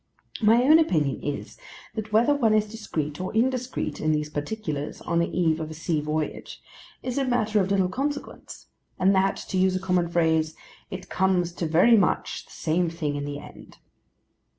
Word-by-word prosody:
My 225 +3 +5
own 310 +5 +7
opinion 155 - +1
is, 145 - -5 0.3
that 220 -1 -5
whether 235 +7 +4
one 230 -7 +3
is 215 0 +2
discreet 170 -9 -4
or 185 - -3
indiscreet 255 +2 -1
in 155 0 +2
these 150 0 -2
particulars, 150 -2 -4
on 170 -1 0
the 170 - +2
eve 165 -3 +1
of 155 -1 -4
a 155 - -8
sea 160 -1 -1
voyage, 150 0 -4 0.4
is 255 +1 -2
a - - +1
matter 220 -4 +1
of 190 - -1
little 195 -2 +2
consequence; 285 +9 -5 0.3
and 190 +2 +4
that, 195 0 +2
to 185 - 0
use 185 0 +3
a - - 0
common 180 -2 0
phrase, 160 -2 +1 0.3
'it 185 0 -7
comes 180 -2 +1
to 170 -1 -3
very 175 +9 +5
much 200 - 0
the - - -19
same 170 +2 0
thing 155 -3 -3
in 145 0 -3
the 145 0 -4
end. - - -13
180 Hz, 185 wpm, -25 LUFS, 155-220 Hz, 0.4 s, own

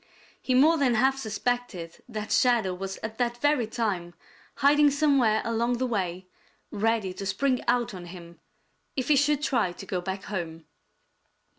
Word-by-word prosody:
He 255 - 0
more 310 +5 +5
than 255 -4 +3
half 265 +4 +2
suspected 220 -6 -3
that 215 -2 -5
Shadow 235 -7 +3
was 190 +1 -5
at 220 +1 -6
that 240 -1 0
very 290 -3 +1
time 195 -7 -3 0.4
hiding 290 +1 +5
somewhere 275 -7 +2
along 235 +1 0
the 255 - 0
way 185 -6 -2 0.5
ready 215 -3 0
to 200 - -7
spring 260 +3 0
out 240 -3 +1
on 180 -2 -8
him 170 -2 -11 0.6
if 260 0 -2
he 300 - +6
should 290 +1 +2
try 240 -10 +1
to - - -10
go 180 -2 -3
back 190 +2 -5
home. 165 -5 -5
230 Hz, 160 wpm, -27 LUFS, 190-260 Hz, 0.6 s, he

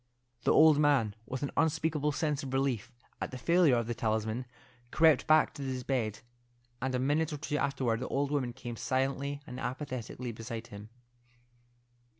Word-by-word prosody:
The - - +4
old 155 -2 +7
man, 140 -8 +3
with 130 +1 -4
an 140 - -2
unspeakable 160 -2 +1
sense 150 -1 -1
of 135 -3 -6
relief 135 -4 0 0.3
at - - -2
the 130 - -7
failure 170 0 +4
of 120 -1 0
the 120 - -2
talisman, 110 +2 -1 0.4
crept 160 -2 +4
back 155 0 +5
to - - -8
his 130 -2 -3
bed, 120 -6 -1 0.6
and 130 0 -1
a - - 0
minute 150 +5 +1
or 150 - -3
two 150 +1 -2
afterward 130 -5 0
the - - -4
old 140 +1 -1
woman 135 -4 0
came 120 -1 -7
silently 135 +3 -1
and 125 -4 -7
apathetically 130 -2 -4
beside 115 0 -6
him. 105 0 -10
130 Hz, 170 wpm, -31 LUFS, 120-145 Hz, 0.6 s, old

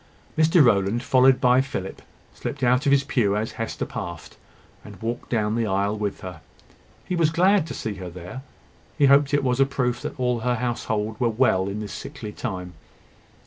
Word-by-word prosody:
Mr 160 -1 +5
Rowland, 105 +1 +2
followed 130 0 +4
by 125 0 +4
Philip, 130 -9 -5 0.3
slipped 140 -1 -6
out 125 +4 +3
of - - +4
his 140 0 +4
pew 120 -8 +1
as 110 +1 -2
Hester 115 - -4
passed, 100 - -7 0.5
and - - -12
walked 115 +2 -4
down 110 -3 0
the 115 -1 0
aisle 100 +1 0
with 105 -2 -3
her. 90 -4 -8 0.6
He 180 - -2
was 165 -3 +3
glad 180 +2 +3
to 140 - -6
see 110 - -4
her 90 -2 -7
there; 90 +8 -9 0.6
he 145 - +4
hoped 140 +1 +5
it 145 -1 +2
was 125 -1 0
a 135 - +6
proof 125 -3 -1
that - - -6
all 125 -1 +1
her 125 +2 0
household 110 -3 -2
were 120 - +2
well 110 -5 +2
in 105 +2 -4
this 105 - -6
sickly 105 -2 -7
time. 90 -3 -5
120 Hz, 190 wpm, -24 LUFS, 105-135 Hz, 0.6 s, a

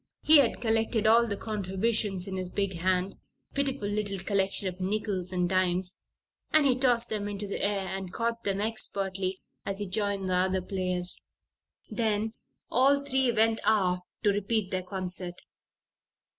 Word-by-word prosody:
He 310 -1 +8
had 250 -5 +2
collected 225 -1 +1
all 230 +2 +5
the 200 -2 -3
contributions 200 -1 0
in 190 - -4
his 185 -1 -4
big 195 0 -1
hand 185 +2 0 0.3
a - - -32
pitiful 275 -6 -1
little 205 -1 -2
collection 195 +1 0
of 185 0 -5
nickels 190 -2 -2
and 180 -1 0
dimes 185 0 +1 0.5
and 310 -2 +5
he 260 -3 +4
tossed 245 -2 +3
them 210 -2 -1
into 205 0 -4
the 200 - -4
air 200 -1 0
and 190 -1 -5
caught 230 +2 -2
them 200 -1 0
expertly 195 -3 -2 0.2
as 195 -1 -3
he 205 - -3
joined 200 0 -1
the 185 - 0
other 185 +1 +1
players. 185 -2 -2 0.7
Then 220 -1 0 0.4
all 275 +3 +4
three 265 -3 +2
went 225 0 +3
aft 190 -4 +2 0.2
to 205 - +4
repeat 205 0 -1
their 185 - 0
concert. 180 -1 -5
200 Hz, 160 wpm, -28 LUFS, 185-225 Hz, 0.7 s, He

